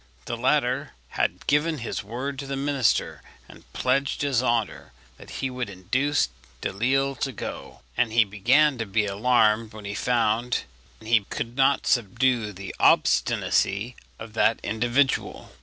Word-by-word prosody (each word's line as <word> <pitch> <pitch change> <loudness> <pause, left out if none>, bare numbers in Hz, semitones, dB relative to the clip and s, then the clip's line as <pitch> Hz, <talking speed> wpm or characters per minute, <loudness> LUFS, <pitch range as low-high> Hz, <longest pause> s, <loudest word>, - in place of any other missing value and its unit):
The - - -3
latter - - 0 0.2
had - - -2
given 155 +2 +1
his 120 -3 -4
word 130 +6 -5
to 140 - -6
the 135 - -3
minister, 135 -4 0 0.3
and - - -17
pledged 135 +3 0
his 135 -4 +1
honour 115 - -1 0.3
that - - -13
he 135 - -4
would 125 -3 -4
induce 125 - 0 0.3
Delisle 135 +7 0
to 135 - -1
go, 120 - -8
and 120 -2 +1
he 115 0 +5
began 125 +8 +2
to 115 - -3
be 105 +2 +1
alarmed 110 +1 +2
when 110 -1 -10
he 100 - -4
found 120 +1 0 0.4
he 115 +1 +3
could 120 +1 -4
not 135 +1 +2
subdue 120 0 +1
the 95 0 -8
obstinacy 105 +6 +2 0.2
of 110 -1 -10
that 110 0 +2
individual. 120 +5 0
120 Hz, 145 wpm, -25 LUFS, 110-135 Hz, 0.4 s, he